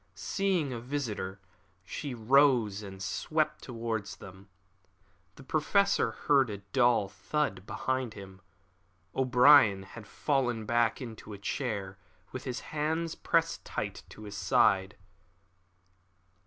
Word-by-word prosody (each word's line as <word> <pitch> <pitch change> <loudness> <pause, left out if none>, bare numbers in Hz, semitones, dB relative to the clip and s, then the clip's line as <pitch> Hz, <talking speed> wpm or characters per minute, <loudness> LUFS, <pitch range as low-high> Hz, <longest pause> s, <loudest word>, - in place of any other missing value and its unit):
Seeing 185 -9 -1
a 120 - -4
visitor, 115 -7 -4 0.4
she 135 +8 -5
rose 120 -3 +3
and 95 -2 -8
swept 155 - -1
towards 115 -4 -4
them. 95 +2 -13 0.9
The 140 - -13
Professor 200 +8 +2 0.2
heard 135 -4 +4
a 105 - -4
dull 115 +1 +2
thud 100 -4 -2
behind 130 -3 -2
him. 95 -2 -11 0.7
O'Brien 125 -5 +6
had 105 +3 -11
fallen 120 -6 -1
back 120 +1 +1
into 110 -3 -9
a - - -7
chair, 100 -3 -3 0.3
with 130 - -7
his 130 -1 -4
hand 160 +2 -1
pressed 165 0 +1
tight - - -4
to 110 - -12
his 105 -1 -8
side. 95 0 +2
120 Hz, 115 wpm, -30 LUFS, 100-145 Hz, 0.9 s, O'Brien